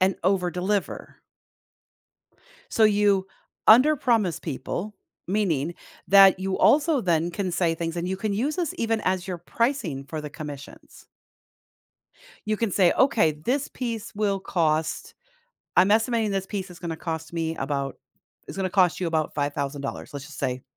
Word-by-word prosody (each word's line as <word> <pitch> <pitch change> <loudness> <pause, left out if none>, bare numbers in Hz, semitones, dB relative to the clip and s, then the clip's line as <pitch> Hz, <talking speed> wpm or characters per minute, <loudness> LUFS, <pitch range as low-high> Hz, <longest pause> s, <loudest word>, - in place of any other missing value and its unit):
and 190 +1 +2
overdeliver. 185 +1 -1 1.6
So 225 - +2
you 205 -2 +3 0.4
underpromise 235 - +4
people, 175 +7 -5 0.3
meaning 175 -6 0 0.3
that 195 -1 +7
you 190 0 -2
also 295 +4 +4
then 170 -2 +1
can 185 0 -3
say 170 -1 +1
things, 165 +1 -4
and 170 +1 -2
you 190 - -1
can 210 +1 -2
use 265 +9 -1
this 350 -4 -2
even 225 -1 0
as 185 0 -1
your 180 -2 -3
pricing 175 - -2
for 155 +2 -5
the 150 - -6
commissions. 145 -2 -10 1.4
You 215 0 0
can 225 -2 -1
say, 180 -2 +4
"Okay, 230 - +3
this 245 - -2
piece 230 -3 -5
will 200 -2 0
cost 160 -4 -1 0.6
I'm 185 +3 +5
estimating 225 0 +2
this 195 -1 -2
piece 195 -2 -4
is 180 - -12
gonna 165 -2 -4
cost 160 -1 -5
me 165 -1 -2
about" 140 -1 -3 0.5
it's - - -8
gonna 190 -1 -1
cost 185 -2 +3
you 180 - -1
about 160 -2 -1
$5,000, 140 -1 -3
let's 145 -1 -7
just 155 - -12
say, 125 0 -2
185 Hz, 150 wpm, -25 LUFS, 160-215 Hz, 1.6 s, that